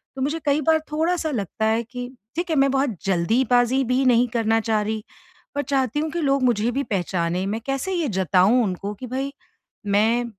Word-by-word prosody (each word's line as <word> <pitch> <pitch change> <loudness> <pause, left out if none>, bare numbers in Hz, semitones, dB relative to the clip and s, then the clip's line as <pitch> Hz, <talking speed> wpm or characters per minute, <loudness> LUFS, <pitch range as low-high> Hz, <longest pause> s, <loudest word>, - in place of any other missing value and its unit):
तो 265 - -5
मुझे 300 +4 -1
कई 290 +1 +2
बार 315 +2 +3
थोड़ा-सा 320 0 0
लगता 220 - -2
है 220 +1 +2
कि 245 +1 -7 0.3
ठीक 345 +1 -2
है 320 - +1
मैं 275 0 +4
बहुत 270 -5 0
जल्दी 195 +7 +2
बाज़ी 245 +2 +3
भी 260 +2 +2
नहीं 245 0 +4
करना 225 0 +2
चाह 215 -1 +1
रही 215 0 -3 0.5
पर 285 - +1
चाहती 270 0 0
हूँ 315 +1 -1
कि 340 0 -2
लोग 275 -2 +1
मुझे 235 -1 +2
भी 275 +3 -1
पहचाने, 180 -3 -1
मैं 215 +3 -3
कैसे 275 +8 -2
ये 335 -5 0
जताऊँ 190 +6 +4
उनको 200 +1 -3
कि 250 - -8
भाई 270 +3 -3 0.6
मैं 230 +3 +3
245 Hz, 200 wpm, -23 LUFS, 215-275 Hz, 0.6 s, मैं